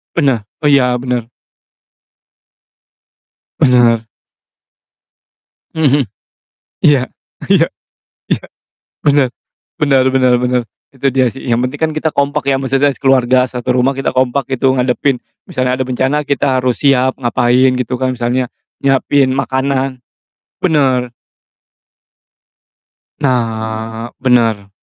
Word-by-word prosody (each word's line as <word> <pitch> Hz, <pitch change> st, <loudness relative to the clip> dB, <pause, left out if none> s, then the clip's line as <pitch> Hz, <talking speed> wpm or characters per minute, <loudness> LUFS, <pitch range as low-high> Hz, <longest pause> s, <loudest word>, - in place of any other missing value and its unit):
Bene 135 Hz, -9 st, +1 dB, 0.2 s
oh -, -, +3 dB
iya, 125 Hz, -3 st, +3 dB
benar. 125 Hz, -2 st, -3 dB, 2.3 s
Benar. 120 Hz, -3 st, +3 dB, 1.7 s
Mhm 145 Hz, -3 st, +3 dB
mhm. -, -, 0 dB, 0.8 s
Iya, 145 Hz, -4 st, +4 dB, 0.5 s
iya, -, -, +5 dB, 0.6 s
iya, -, -, 0 dB, 0.6 s
bener 145 Hz, -3 st, +3 dB, 0.5 s
bener 135 Hz, -4 st, +3 dB
bener 130 Hz, -1 st, +3 dB
bener, 125 Hz, 0 st, +1 dB, 0.3 s
itu 135 Hz, -, -2 dB
dia 130 Hz, -1 st, +3 dB
sih, 135 Hz, -, -11 dB
yang 120 Hz, -1 st, +1 dB
penting 130 Hz, +3 st, -2 dB
kan 160 Hz, -1 st, 0 dB
kita 155 Hz, +1 st, 0 dB
kompak 140 Hz, 0 st, -1 dB
ya, 135 Hz, -, +2 dB
maksudnya 135 Hz, +1 st, +1 dB
sekeluarga 130 Hz, -2 st, +2 dB
satu 125 Hz, 0 st, -4 dB
rumah 130 Hz, +2 st, +2 dB
kita 135 Hz, 0 st, -1 dB
kompak 130 Hz, +1 st, +1 dB
gitu, 130 Hz, +1 st, +2 dB
ngadepin 125 Hz, +1 st, 0 dB, 0.3 s
misalnya 130 Hz, 0 st, -1 dB
ada 130 Hz, -, 0 dB
bencana, 130 Hz, +4 st, 0 dB
kita 140 Hz, -2 st, +1 dB
harus 125 Hz, -1 st, -1 dB
siap 130 Hz, -2 st, +3 dB
ngapain 125 Hz, +1 st, +2 dB
gitu 125 Hz, 0 st, -2 dB
kan, 130 Hz, 0 st, +1 dB
misalnya 125 Hz, +1 st, -1 dB, 0.3 s
nyiapin 135 Hz, 0 st, +2 dB
makanan 135 Hz, -1 st, -1 dB, 0.6 s
bener. 130 Hz, -7 st, +2 dB, 2.1 s
Nah, 115 Hz, -3 st, -2 dB
bener. 115 Hz, -6 st, +2 dB
130 Hz, 110 wpm, -15 LUFS, 125-135 Hz, 2.3 s, iya